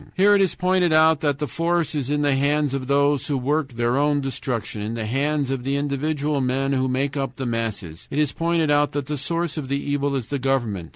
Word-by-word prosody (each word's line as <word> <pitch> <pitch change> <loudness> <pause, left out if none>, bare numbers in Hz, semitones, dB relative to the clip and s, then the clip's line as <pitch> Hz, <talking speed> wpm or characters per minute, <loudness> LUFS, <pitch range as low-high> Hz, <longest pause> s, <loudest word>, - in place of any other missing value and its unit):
Here 200 +2 +5
it 200 - +4
is 190 - +1
pointed 180 -1 +2
out 160 0 +5
that 145 -3 0
the 150 - -2
force 165 +4 -1
is 140 -3 -2
in 145 0 0
the 145 -1 +3
hands 145 +1 +1
of 135 -2 -3
those 140 0 +2
who 145 - 0
work 140 +1 -1
their 120 +2 0
own 145 0 +2
destruction, 130 -5 -4
in 110 +2 -3
the 115 -2 -3
hands 140 +3 0
of 135 -2 -3
the 135 +2 -1
individual 145 +1 -1
men 135 +2 0
who 130 -1 +1
make 135 +2 -1
up 135 -3 -3
the 130 - -4
masses; 110 -8 -4
it - - -5
is 150 -2 +2
pointed 165 -2 0
out 145 0 +2
that 145 -1 -2
the 150 - -3
source 165 +3 -2
of 145 -4 -4
the 140 +1 0
evil 145 0 -1
is 130 -4 -2
the 140 - -2
government. 120 -10 -1
140 Hz, 240 wpm, -23 LUFS, 130-150 Hz, -, Here